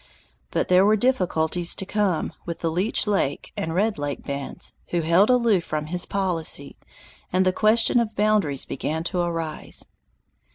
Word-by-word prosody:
But - - -1
there 180 +1 +5
were 210 +2 +4
difficulties 180 -7 +1
to 195 - -4
come 195 -5 -1
with 170 -1 -6
the 165 - -1
Leech 185 +7 +2
Lake 195 -9 -1
and 160 0 -3
Red 210 +1 0
Lake 145 -1 -4
bands, 140 -1 -4
who 175 - -1
held 170 +7 +3
aloof 235 -7 +3
from 155 -2 -4
his 175 +3 +1
policy, 170 -7 +1 0.6
and 185 +1 +2
the 185 - +2
question 225 +4 +4
of 225 -2 -2
boundaries 205 -10 +1
began 160 +4 -3
to 180 +1 -2
arise. 165 -3 -2
180 Hz, 160 wpm, -23 LUFS, 160-210 Hz, 0.6 s, there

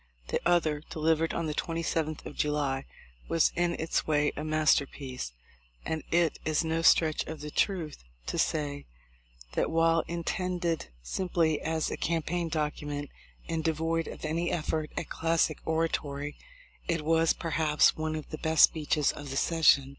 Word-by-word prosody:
The - - 0
other, 160 -4 +2
deliv 160 0 +2
ered 165 +1 0
on 170 - -2
the 155 - -2
27th 165 -1 -2
of - - -7
July, 145 -3 0 0.4
was 165 - +3
in 175 0 +1
its 160 - -1
way 150 -1 +2
a 150 - -4
master 155 -2 +3
piece; 130 - -6 0.5
and 160 -1 -2
it 170 -2 +2
is 155 +1 +1
no 160 +1 0
stretch 160 -1 +4
of 160 -1 -6
the 150 0 -6
truth 165 - -1 0.2
to - - -2
say 145 -2 -1 0.7
that - - +1
while 165 0 +3
intended 170 0 -2 0.2
simply 165 - 0
as 160 0 -1
a - - -3
campaign 170 +1 -1
document 150 -2 -3 0.4
and 165 -1 -2
devoid 165 +1 0
of - - -7
any 165 +3 -1
effort 155 -1 -1
at 165 - -3
classic 165 -2 +1
orator} 160 0 +1
7, 145 0 -5 0.5
it 165 -3 -1
was, 165 0 +4
per 165 - -5
haps, 150 -1 +4
one 155 0 -2
of 155 - -7
the 155 - -5
best 160 -1 +4
speeches 150 -2 +3
of 145 -1 -8
the 135 - -3
session. 145 -5 +4
160 Hz, 165 wpm, -29 LUFS, 150-165 Hz, 0.7 s, stretch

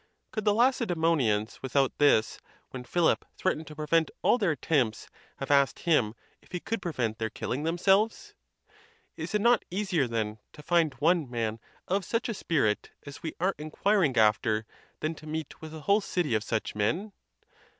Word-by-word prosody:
Could 215 -1 -4
the 210 - +4
Lacedzmonians 165 - +1
without 135 0 +1
this, 140 -7 +3 0.3
when 130 -1 -6
Philip 170 +6 +2
threatened 160 -4 -1
to 150 - -10
prevent 155 +2 +1
all 245 - +4
their 200 -5 +2
attempts, 140 -6 0 0.3
have 135 +1 -4
asked 140 -1 +3
him 125 -10 +2 0.3
if - - -24
he 180 - -1
could 225 +3 -3
prevent 120 -11 -2
their 110 0 -1
killing 130 +5 -3
themselves? 190 +7 +1 0.8
Is - - -4
it 210 - +2
not 235 +1 +4
easier, 180 -7 0
then, 110 -2 -2
to 150 - -12
find 165 -3 +2
one 165 -2 +2
man 115 -2 -2 0.3
of'such 200 +6 -1
a - - -1
spirit 140 - 0 0.2
as 140 -1 -9
we 160 -2 -5
are 185 +3 +2
inquiring 155 -1 +1
after, 110 0 +3 0.4
than 155 +1 -1
to 155 -1 -13
meet 155 -1 -5
with 160 -1 -8
a 160 -1 -8
whole 200 +7 +3
city 175 - -1
of 110 -1 +1
such 110 -1 -2
men? 165 - -1
155 Hz, 170 wpm, -28 LUFS, 125-180 Hz, 0.8 s, the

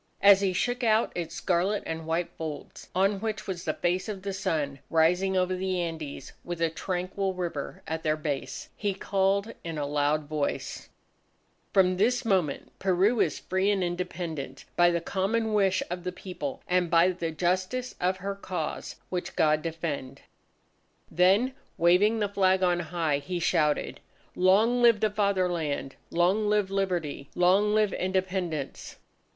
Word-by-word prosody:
As 200 -1 +8
he 195 -2 +2
shook 245 +7 -1
out 220 0 +3
its 170 -1 -4
scarlet 190 +3 0
and 160 0 -5
white 165 +2 -1
folds 155 -2 -7
on 195 +2 +2
which 220 0 -3
was 185 -2 -5
the - - -1
face 180 +4 -1
of 195 -3 -5
the 200 -1 -3
Sun 155 -8 -2
rising 180 +4 +3
over 185 0 +1
the 185 0 -1
Andes 160 -5 -5
with 175 -1 -5
a 165 -1 +1
tranquil 185 +2 -2
river 170 -6 -4
at 160 +1 -3
their 155 -1 +1
base, 150 -3 -4
he 200 -3 -2
called 195 +2 0
in 165 -2 -5
a 145 - -1
loud 145 +1 +1
voice: 145 0 -3 0.8
"From 185 -1 +4
this 240 +5 +2
moment 185 -10 0
Peru 195 +5 +2
is 155 - +2
free 190 +2 0
and 200 -2 +1
independent 175 -6 -4
by 175 0 +5
the 170 -1 0
common 215 +5 0
wish 195 -3 +2
of 180 0 -4
the 180 - -2
People, 180 -6 -6
and 180 -1 +2
by 170 +2 +5
the 175 -2 -2
justice 185 +10 -1
of 185 +1 +1
her 200 +1 -3
cause, 180 -5 -5
which 180 -1 -4
God 155 -1 +3
defend!" 160 -5 -4 0.9
Then 195 +9 +4 0.2
waving 180 +6 +4
the 210 -2 +1
flag 190 -1 +2
on 175 -1 +3
high, 165 -4 -1
he 180 +4 -4
shouted: 150 -3 +1 0.4
"Long 215 +7 +4
live 235 -3 +6
the 215 - +1
Fatherland! 180 -9 0
Long 190 +5 +2
live 210 -2 +1
Liberty! 175 -8 -2
Long 195 +4 +4
live 215 -2 +2
Independence!" 185 -6 -2
180 Hz, 155 wpm, -28 LUFS, 165-195 Hz, 0.9 s, As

